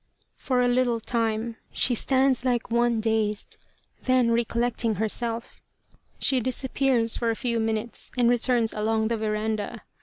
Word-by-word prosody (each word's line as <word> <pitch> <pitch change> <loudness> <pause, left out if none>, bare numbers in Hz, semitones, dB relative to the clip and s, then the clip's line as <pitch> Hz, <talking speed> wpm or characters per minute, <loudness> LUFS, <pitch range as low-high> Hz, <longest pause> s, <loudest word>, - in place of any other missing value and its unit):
For 255 -2 0
a 245 - +3
little 245 -1 +1
time 225 0 -2
she 250 - +2
stands 260 +1 +2
like 245 -3 -1
one 235 -1 +2
dazed; 215 -2 -1 0.4
then, 255 -2 +2
recollecting 235 -1 0
herself, 230 +3 -1 0.6
she 265 - +3
disappears 255 -1 +1
for 235 - -1
a 225 - 0
few 235 -1 -1
minutes 220 +1 -2
and 245 -1 +3
returns 240 -1 +2
along 220 +1 0
the 230 - 0
veranda. 215 -1 -3
235 Hz, 140 wpm, -25 LUFS, 220-245 Hz, 0.6 s, a